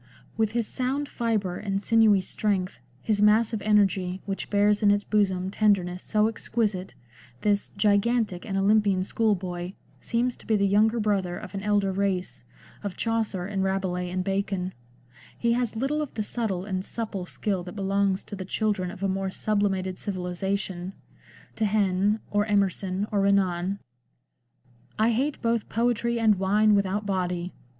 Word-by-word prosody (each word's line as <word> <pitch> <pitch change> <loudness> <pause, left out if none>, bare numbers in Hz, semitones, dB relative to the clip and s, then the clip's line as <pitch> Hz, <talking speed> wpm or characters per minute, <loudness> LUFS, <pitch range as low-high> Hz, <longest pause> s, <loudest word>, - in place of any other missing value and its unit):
With 220 -1 0
his 235 -1 0
sound 265 +5 -2
fibre 215 -8 -1
and 195 -1 -2
sinewy 215 -2 +4
strength, 190 -1 -2 0.2
his 210 -2 +1
massive 215 +1 +4
energy, 195 -3 +2
which 195 -1 -4
bears 205 0 +3
in 205 - +5
its 205 0 +3
bosom 190 -3 +1
tenderness 185 -4 +1
so 215 0 +2
exquisite, 215 -4 -2 0.5
this 205 -1 +1
"gigantic 205 -1 +2
and 195 -3 -3
Olympian 200 -1 +3
schoolboy 185 -4 -1
" - - -32
seems 240 +1 0
to - - -18
be 220 - +3
the 200 -1 +2
yx)unger 220 +3 +4
brother 195 -4 0
of 185 - -9
an 195 - -4
elder 205 -1 +1
race, 190 -1 -1 0.4
of 200 -3 -5
Chaucer 225 -5 -1
and 195 -1 -2
Rabelais 190 -2 -1
and 185 +1 -2
Bacon; 195 -1 -2 0.6
he 235 0 +2
has 240 -2 -1
little 275 +6 0
of 295 - -5
the 215 - -1
subtle 205 -5 -2
and 190 -2 -2
supple 200 -4 -4
skill 195 -1 -2
that 180 +2 -9
belongs 195 -1 0
to 205 - -8
the 190 - -5
children 195 -1 -1
of 195 +1 -8
a - - +2
more 195 0 -1
sublimated 195 -2 -1
civilisation, 190 -1 -3 0.6
to 220 - +1
Heine, 205 0 +1
or 205 +1 +1
Emerson, 195 -1 0
or 205 -2 +2
Renan. 195 -1 +1 0.6
" 120 +1 -43 0.3
I 220 +2 +3
hate 270 +6 0
both 230 -2 0
poetry 235 0 0
and 215 -4 +3
wine 210 +3 +4
without 200 +1 +1
body. 180 -2 -2
200 Hz, 160 wpm, -26 LUFS, 190-215 Hz, 0.6 s, in